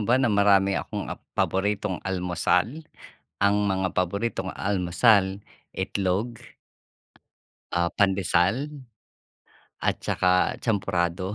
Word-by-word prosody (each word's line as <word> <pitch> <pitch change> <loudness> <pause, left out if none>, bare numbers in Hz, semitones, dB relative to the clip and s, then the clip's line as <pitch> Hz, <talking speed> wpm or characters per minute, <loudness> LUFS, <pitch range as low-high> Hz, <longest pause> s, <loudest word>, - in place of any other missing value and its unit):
ba 125 - +5
na 125 -5 +2
marami 100 -1 +4
akong - - -5
ap - - -10 0.2
paboritong 100 0 0
almusal? 90 - 0 0.6
Ang 100 0 +4
mga 95 -1 -1
paboritong 95 +2 -1
almusal, 95 +1 +2 0.3
itlog. 100 +5 -2 1.3
Ah, 85 0 +1
pandesal, 95 +5 +1 1.2
at - - 0
tsaka 90 0 +1
champurado. 95 -3 -1
95 Hz, 90 wpm, -25 LUFS, 90-105 Hz, 1.3 s, ba